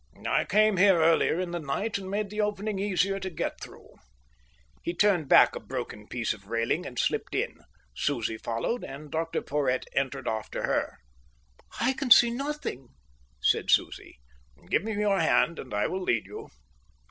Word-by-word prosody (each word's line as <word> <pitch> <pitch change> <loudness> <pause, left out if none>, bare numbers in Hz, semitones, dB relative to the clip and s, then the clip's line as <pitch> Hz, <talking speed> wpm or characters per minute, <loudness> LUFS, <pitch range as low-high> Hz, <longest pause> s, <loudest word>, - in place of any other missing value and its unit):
"I - - +2
came 215 -1 +3
here 190 -2 +5
earlier 165 +1 +3
in 180 -1 -3
the 175 - -3
night 185 +9 -2
and 190 -1 -8
made 205 0 -2
the 210 0 -1
opening 210 -1 -2
easier 195 0 0
to 190 0 -4
get 170 - -4
through." - - -12 0.8
He 170 - -4
turned 175 -7 +2
back - - +6
a - - -4
broken 105 0 -6
piece 120 -3 -2
of 100 -2 -15
railing 115 - -1
and 125 - -10
slipped - - -1
in. - - -2 0.4
Susie 115 - -1
followed, 115 - -2
and 145 +2 -9
Dr 165 +1 -2
Porhoët 135 -3 0
entered 135 -1 -2
after 110 -1 -3
her. - - -1 0.8
"I 255 +3 +2
can 270 0 -4
see 240 0 +8
nothing," 275 - -4 0.6
said - - +2
Susie. - - +1 0.5
"Give - - +2
my 220 - -4
your 205 -1 +1
hand, 170 - +2
and 130 - -9
I 105 0 0
will 190 +1 -2
lead 120 -11 0
you." - - -9
175 Hz, 170 wpm, -27 LUFS, 135-205 Hz, 0.8 s, see